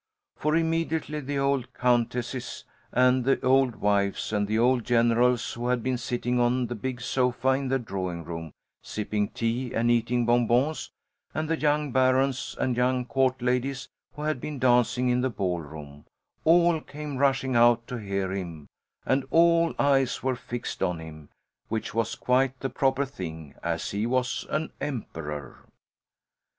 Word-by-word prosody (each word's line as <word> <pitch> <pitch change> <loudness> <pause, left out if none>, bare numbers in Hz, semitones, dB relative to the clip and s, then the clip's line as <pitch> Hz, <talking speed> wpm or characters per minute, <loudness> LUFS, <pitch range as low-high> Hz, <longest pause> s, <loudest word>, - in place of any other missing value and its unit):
For 155 +1 0
immediately 160 -2 0
the 140 0 -3
old 140 -2 0
countesses 120 0 -1 0.3
and 125 +1 +3
the 135 +2 +2
old 130 -2 +4
wives 100 0 0
of 105 -1 +1
the 110 +1 0
old 120 +1 +3
generals 120 +1 +2
who 120 +1 -4
had 125 -2 0
been 130 -1 -1
sitting 120 +1 -1
on 120 +1 +2
the 120 - -4
big 125 +2 -4
sofa 125 +1 0
in 135 +1 +1
the 135 +1 +2
drawing 95 -7 -4
room, 80 -1 -6 0.3
sipping 105 -1 -2
tea 120 +4 -2
and 120 +1 +2
eating 120 +1 +1
bonbons, 120 +5 +2 0.5
and 155 0 -1
the 165 - +1
young 150 -1 +1
barons 130 +1 +2
and 125 - +1
young 125 0 +1
Court 130 0 +1
ladies 125 +2 -1 0.2
who 150 - -7
had 155 -4 -1
been 150 -2 -5
dancing 125 0 +3
in 125 0 +2
the 130 - +1
ballroom, 80 - -5 0.4
all 170 0 +5
came 150 -2 -7
rushing 135 -1 +1
out 120 0 +5
to 125 - -5
hear 100 -3 -2
him 85 -6 -6 0.4
and 135 +1 +2
all 170 +2 +4
eyes 135 -2 +2
were 130 -1 +1
fixed 120 0 -6
on 90 -2 0
him, 80 -2 -10 0.4
which 110 0 -3
was 115 0 -1
quite 130 +1 +1
the 135 - -2
proper 135 -1 +1
thing, 80 - -8
as 85 -1 -2
he 105 +3 -1
was 125 0 -1
an 155 +1 -2
emperor. 80 - -6
125 Hz, 160 wpm, -27 LUFS, 115-135 Hz, 0.5 s, all